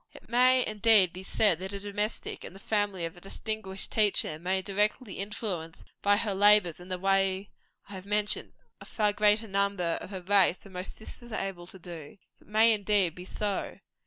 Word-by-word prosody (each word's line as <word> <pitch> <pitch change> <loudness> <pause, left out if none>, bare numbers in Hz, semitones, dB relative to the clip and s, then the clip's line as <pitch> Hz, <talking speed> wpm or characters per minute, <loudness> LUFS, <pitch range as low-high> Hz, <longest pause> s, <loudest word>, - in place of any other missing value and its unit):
It - - -14
may 255 +1 +4
indeed 215 -4 +4
be 185 - -8
said, 190 -2 +2
that 190 +2 -6
a 200 - -4
domestic, 205 +2 -3
in - - -9
the 195 - -13
family 205 -4 -1
of 165 +2 -7
a 175 - -15
distinguished 195 0 -5
teacher, 205 -7 +2
may 185 +3 0
indirectly 205 +3 -1
influence, 195 -5 -5 0.2
by 205 0 +3
her 210 -2 -1
labors 205 -4 +5
in 180 +1 -12
the 185 - -2
way 195 +1 +1 0.4
I 200 - -11
have 190 0 -9
mentioned, 210 0 0 0.3
a - - -12
far 210 -2 0
greater 210 +2 +3
number 200 -4 0
of - - -8
her 190 -3 -7
race 195 -1 +4
than 195 - -16
most 180 +1 -5
sisters 235 +2 -10
are 215 - -2
able 175 -3 -9
to 190 - -10
do. 170 0 -10 0.2
It - - -24
may, 220 +2 +5
indeed, 205 -4 +1
be 180 +1 -10
so. 205 +1 -3
200 Hz, 195 wpm, -29 LUFS, 185-210 Hz, 0.4 s, labors